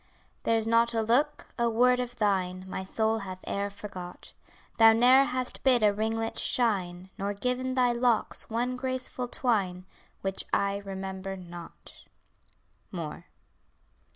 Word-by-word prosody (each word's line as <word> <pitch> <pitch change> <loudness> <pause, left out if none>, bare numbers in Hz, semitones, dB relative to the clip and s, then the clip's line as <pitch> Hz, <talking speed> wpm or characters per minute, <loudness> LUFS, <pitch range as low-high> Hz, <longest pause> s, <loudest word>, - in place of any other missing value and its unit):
There's 225 -1 +2
not 230 +1 +3
a 225 - +2
look, 275 +7 +1
a 235 0 +3
word 250 +2 +3
of 245 -1 -4
thine 185 -4 0
My 190 - -4
soul 220 +3 0
hath 185 -2 -8
e'er 200 0 -1
forgot; 195 -3 -9 0.5
Thou 225 0 +8
ne'er 250 +4 +6
hast 255 -1 -2
bid 250 -4 +4
a 205 -1 +5
ringlet 225 +2 -1
shine, 190 -6 0
Nor 200 +1 -2
given 250 +4 -1
thy 250 -2 +3
locks 240 -2 +1
one 240 +3 -1
graceful 255 -1 -3
twine, 195 -8 0 0.4
Which 195 0 -1
I 200 0 +1
remember 195 -1 -6
not. 175 -2 -11 0.9
MOORE. - - -6
225 Hz, 135 wpm, -28 LUFS, 195-245 Hz, 0.9 s, Thou